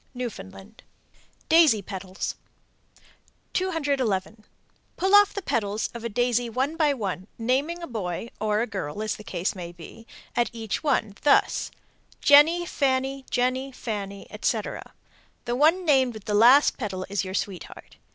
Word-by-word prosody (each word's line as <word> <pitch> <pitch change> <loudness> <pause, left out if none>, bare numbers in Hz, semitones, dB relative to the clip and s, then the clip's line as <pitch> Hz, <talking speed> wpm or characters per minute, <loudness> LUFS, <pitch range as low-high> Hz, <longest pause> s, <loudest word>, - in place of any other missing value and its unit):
Newfoundland. 210 -3 -8 0.7
DAISY 315 -11 +5
PETALS. 190 0 -5 1.2
211. 265 - -1 0.5
Pull 380 +2 0
off 410 -1 +7
the 400 - -5
"petals" 210 -5 -1
of 235 -1 -8
a 235 - -2
daisy 245 +1 0
one 265 +7 -1
by 310 -3 +3
one, 195 -7 -4
naming 275 +9 -1
a - - -5
boy 215 -2 -4
(or 210 0 +1
a - - +1
girl 200 -3 -5
as 215 - -2
the 215 - -11
case 180 -2 -2
may 175 -3 -7
be) 175 +7 -13 0.3
at 240 - +1
each 225 -3 -4
one, 250 -9 0
thus, 290 - +3 0.5
"Jenny, 315 +5 +6
Fanny, 270 -3 -1
Jenny, 255 +2 0
Fanny," 200 -5 -6
etc. - - -3 0.5
The 240 - -1
one 325 +7 +3
named 260 -6 +3
with 215 - -10
the 210 - -2
last 245 +7 +6
petal 190 -5 -4
is 200 +1 -1
your 190 0 -5
sweetheart. 195 -3 -6
235 Hz, 145 wpm, -25 LUFS, 200-280 Hz, 1.2 s, off